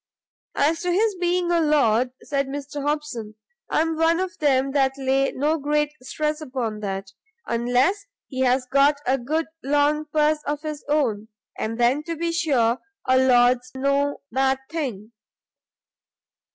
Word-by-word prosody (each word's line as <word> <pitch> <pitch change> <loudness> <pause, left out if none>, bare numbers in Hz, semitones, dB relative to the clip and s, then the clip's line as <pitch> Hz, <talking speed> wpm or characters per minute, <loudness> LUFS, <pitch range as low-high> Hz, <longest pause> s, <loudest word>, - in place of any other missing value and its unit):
"As 315 +3 +1
to 360 - 0
his 420 +4 +2
being 350 0 0
a 340 - +3
Lord," 255 -6 +3
said 275 -1 -1
Mr 285 +1 -5
Hobson, 285 -7 -3 0.3
"I - - +2
am 325 0 -1
one 330 +1 +3
of 375 -1 -3
them 275 -3 +2
that 270 -1 +1
lay 270 0 +1
no 305 +4 0
great 295 +1 0
stress 300 +4 -2
upon 250 -7 -3
that, 195 -1 -4 0.3
unless 245 - +1 0.2
he 260 - -6
has 255 0 +2
got 280 +3 +3
a 265 +2 +1
good 310 +7 -1 0.2
long 290 +2 +2
purse 305 0 +2
of 295 +1 -2
his 305 -2 -5
own, 235 -8 0 0.3
and 225 +2 -4
then, 245 +5 +3
to 335 - -3
be 335 +1 -2
sure, 265 -9 +1 0.3
a 260 0 +4
Lord's 250 -1 +4
no 280 +2 0
bad 265 +2 +2
thing. 240 -10 -4
280 Hz, 150 wpm, -23 LUFS, 255-305 Hz, 0.3 s, a